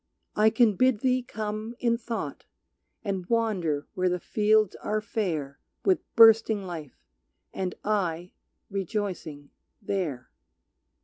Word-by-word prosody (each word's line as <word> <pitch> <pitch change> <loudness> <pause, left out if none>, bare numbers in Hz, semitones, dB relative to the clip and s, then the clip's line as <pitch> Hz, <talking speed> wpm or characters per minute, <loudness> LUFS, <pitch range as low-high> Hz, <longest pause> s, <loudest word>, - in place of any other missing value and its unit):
I 215 +1 +5
can 220 -2 +3
bid 255 -4 +3
thee 255 -1 +2
come 215 0 -5
In 235 -2 +1
thought 230 0 -5 0.6
and 195 -4 -3
wander 185 -11 0
where 185 0 +1
the 180 0 -1
fields 215 +1 +2
are 215 0 -1
fair 170 - -3 0.3
With 380 -2 +4 0.2
bursting 225 -2 +6
life, 160 -6 -8 0.5
and 185 -1 -3
I, 180 -4 -1 0.4
rejoicing, 185 -7 -4 0.3
there. 180 - -3
210 Hz, 115 wpm, -27 LUFS, 180-225 Hz, 0.6 s, bursting